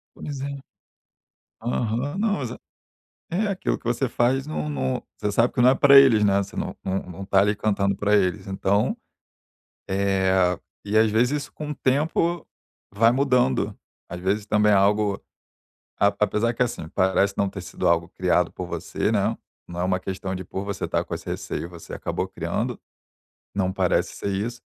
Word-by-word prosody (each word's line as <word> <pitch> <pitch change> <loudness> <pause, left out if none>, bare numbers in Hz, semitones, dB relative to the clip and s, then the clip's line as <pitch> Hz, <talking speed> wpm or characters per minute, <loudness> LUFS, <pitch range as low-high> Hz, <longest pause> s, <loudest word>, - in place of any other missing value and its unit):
Pois 140 -2 -6
é. 140 +1 -4 1.1
Aham. 120 - -1
Não, 205 -4 0
exa 125 -1 -5 0.7
é 200 +6 0
aquilo 195 -2 -1
que - - -30
você 120 +2 0
faz, 130 +4 +1
não 75 - -3
não 65 -3 -2 0.2
você 105 - -1
sabe 115 +4 +2
que 125 - -1
não 125 - +7
é - - +4
pra 140 0 +8
eles, 120 -6 +6
né, 100 -1 +3
você 100 - -10
não - - -3
não 95 0 -1
não 90 +2 -9
está 95 0 +3
ali 105 +1 +2
cantando 100 -2 0
pra 105 +2 +2
eles, 95 -3 0
então, 100 +1 0 0.9
eh, 95 -2 +2 0.3
e 105 - -2
às 110 0 +5
vezes 115 +4 +2
isso 145 0 -3
com 150 -1 -5
o - - -4
tempo 160 +6 0 0.5
vai 115 +3 +5
mudando, 125 - +2 0.3
às 90 - -7
vezes 100 +3 -1
também 105 -1 +3
é - - +5
algo 100 +1 +3 0.8
a 100 - +5
apesar 105 +3 +2
que 120 - 0
assim, 120 -9 -3
parece 95 +1 +2
não 100 - +2
ter - - -7
sido - - -2
algo 85 0 +2
criado - - +1
por - - -6
você, - - -2
né, - - +1 0.3
não 85 0 -6
é - - +1
uma 90 0 +1
questão 95 0 -4
de 95 0 -5
por 95 +3 -5
você 100 -1 -3
estar - - 0
com - - -5
esse - - -8
receio 85 - -4
você 85 -2 -9
acabou 95 - -3
criando, 95 +8 -3 0.8
não 95 -2 0
parece - - 0
ser - - -3
isso, 115 +5 -3
105 Hz, 185 wpm, -24 LUFS, 95-125 Hz, 1.1 s, pra